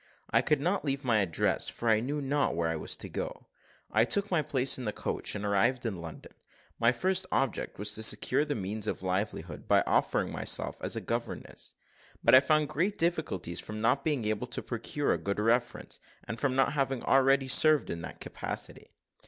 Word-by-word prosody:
I 115 - +4
could 150 +2 +1
not 180 +7 0
leave 140 -1 -1
my 115 -4 +3
address, 95 -5 0
for 120 - -5
I 110 -1 +5
knew 145 +6 -2
not 145 - +1
where 85 -1 0
I 80 - -1
was 80 - -3
to - - -6
go. - - -5 0.5
I 110 - +4
took 200 - -1
my 170 -4 +3
place 135 -2 +1
in 125 - -5
the 105 - 0
coach, - - -2
and 105 0 -4
arrived 120 +6 +1
in 95 -7 -3
London. 80 -1 -9 0.5
My 115 +1 +5
first 185 +8 +1
object 135 -3 -1
was 105 0 -3
to 110 - -3
secure 110 +5 +2
the 150 -1 -2
means 105 +1 -2
of - - -3
livelihood, 90 -4 -3
by - - +4
offering - - +1
myself - - -2
as - - -1
a - - -3
governess; - - -5 0.5
but 115 - +5
I 130 - +11
found 155 +2 +2
great 185 +10 -1
difficulties 155 - 0
from 110 0 -6
not 115 +5 +2
being 145 -8 0
able 110 +3 -1
to 120 - -5
procure 120 +5 -1
a - - -2
good 100 +1 -2
reference, 120 +3 0 0.2
and 115 +3 -6
from 135 -3 0
not 135 +2 +2
having 135 -3 -1
already 135 0 +4
served 155 +3 +4
in 85 - -4
that - - -8
capacity. - - -5
120 Hz, 200 wpm, -30 LUFS, 105-145 Hz, 0.5 s, I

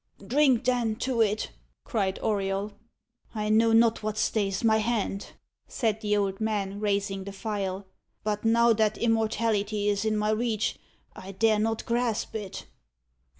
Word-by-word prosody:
"Drink, 260 +1 +3
then, 245 -4 +1
to 250 0 -1
it!" 215 0 0 0.3
cried 195 -6 -1
Auriol. 200 -1 -1 0.6
"I 210 -1 -1
know 225 +1 +4
not 225 0 +4
what 215 0 -3
stays 200 -2 0
my 220 -1 +4
hand," 215 -3 -2 0.3
said 220 -3 -1
the 210 -1 +1
old 195 0 -1
man, 205 -2 -1
raising 200 -2 -1
the 200 - -7
phial; 195 -1 -4 0.4
"but 210 0 -2
now 230 +1 +4
that 215 -1 +1
immortality 220 -2 0
is 205 0 0
in 215 -1 0
my 210 0 +1
reach, 220 -1 -1 0.4
I 195 +1 -9
dare 215 +1 +3
not 225 +1 -1
grasp 235 -2 -1
it." 205 -4 -6
215 Hz, 150 wpm, -27 LUFS, 200-225 Hz, 0.6 s, know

